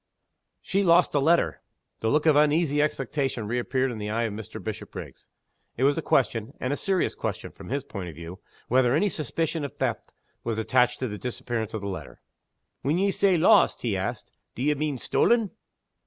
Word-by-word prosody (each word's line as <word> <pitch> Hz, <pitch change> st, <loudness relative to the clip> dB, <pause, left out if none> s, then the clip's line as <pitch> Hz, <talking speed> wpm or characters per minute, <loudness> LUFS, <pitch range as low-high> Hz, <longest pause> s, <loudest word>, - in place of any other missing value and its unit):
"She 195 Hz, -, +1 dB
lost 175 Hz, -1 st, +4 dB
a 145 Hz, -, +3 dB
letter." 165 Hz, +5 st, +2 dB, 0.4 s
The 110 Hz, -, 0 dB
look 150 Hz, +4 st, +2 dB
of 155 Hz, -2 st, +5 dB
uneasy 150 Hz, 0 st, +3 dB
expectation 135 Hz, -5 st, -1 dB
reappeared 125 Hz, +3 st, 0 dB
in 115 Hz, -, -6 dB
the 105 Hz, 0 st, -4 dB
eye 115 Hz, +2 st, 0 dB
of 115 Hz, -3 st, -2 dB
Mr. 105 Hz, -1 st, -7 dB
Bishopriggs. -, -, -7 dB, 0.5 s
It 130 Hz, -, 0 dB
was 140 Hz, +1 st, +4 dB
a 165 Hz, -, -2 dB
question 115 Hz, -6 st, 0 dB
and 130 Hz, +2 st, -1 dB
a -, -, 0 dB
serious 190 Hz, +3 st, 0 dB
question, -, -, -4 dB
from -, -, -12 dB
his 140 Hz, +1 st, -1 dB
point 95 Hz, -9 st, -6 dB
of 80 Hz, -, -10 dB
view 85 Hz, +3 st, -9 dB, 0.3 s
whether 125 Hz, +1 st, +3 dB
any 200 Hz, +6 st, +2 dB
suspicion 160 Hz, 0 st, -2 dB
of 140 Hz, -, -5 dB
theft -, -, -3 dB, 0.3 s
was 115 Hz, -2 st, -2 dB
attached 125 Hz, +2 st, +2 dB
to 130 Hz, -, 0 dB
the 105 Hz, -2 st, -6 dB
disappearance 120 Hz, -3 st, -4 dB
of 110 Hz, -, -4 dB
the 100 Hz, -, -4 dB
letter. 95 Hz, -2 st, -7 dB, 0.6 s
"When 150 Hz, +5 st, +1 dB
ye 195 Hz, +2 st, +2 dB
say 190 Hz, -2 st, +3 dB
'lost,'" 160 Hz, -, +4 dB
he -, -, 0 dB
asked, -, -, -4 dB, 0.2 s
"d'ye 145 Hz, +5 st, +1 dB
mean 150 Hz, -1 st, -2 dB
stolen?" 225 Hz, -, +2 dB
135 Hz, 190 wpm, -26 LUFS, 115-155 Hz, 0.6 s, of